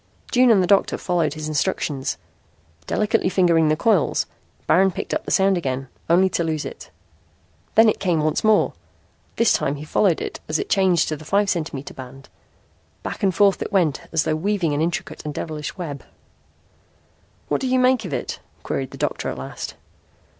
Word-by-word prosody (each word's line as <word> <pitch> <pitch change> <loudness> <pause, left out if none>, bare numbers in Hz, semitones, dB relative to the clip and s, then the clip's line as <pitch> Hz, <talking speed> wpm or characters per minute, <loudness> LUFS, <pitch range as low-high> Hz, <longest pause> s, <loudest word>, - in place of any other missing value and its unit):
June 250 0 +5
and 200 -5 +5
the - - +2
doctor 195 +2 +3
followed 170 -5 0
his 155 0 -5
instructions. 150 -3 -1 0.7
Delicately 215 -2 +1
fingering 170 -4 +3
the 155 - +3
coils, 195 0 +2 0.4
Baron 190 +3 +4
picked 180 - -5
up - - -2
the - - -5
sound 195 -2 +3
again, 135 -3 -3 0.2
only 180 +3 +5
to 170 - -1
lose 155 -2 -2
it. - - -9 0.9
Then 225 +1 +7
it 215 - +2
came 175 -4 +1
once 155 0 0
more. 215 -1 +3 0.6
This 230 - +3
time 140 - 0
he 145 - -8
followed 175 +2 +2
it - - -5
as 155 - +1
it - - -4
changed 185 -4 +3
to 155 - -1
the 155 - -12
five 200 +5 +1
centimeter 155 -5 -4
band. 135 +1 -11 0.7
Back - - -5
and 190 -3 +1
forth 200 -2 +3
it - - -4
went 175 -8 +1
as 160 -1 +2
though 155 -1 0
weaving 180 -2 0
an 145 - 0
intricate 165 +1 -3
and 150 -1 -5
devilish 155 -2 -5
web. 150 -6 -6 1.4
"What - - -1
do 265 - -1
you 255 0 +2
make 255 -2 +3
of 185 - -6
it?" 135 - -4 0.2
queried 135 -1 -3
the - - -11
doctor - - -2
at - - -5
last. 65 +1 -6
170 Hz, 185 wpm, -22 LUFS, 150-195 Hz, 1.4 s, Then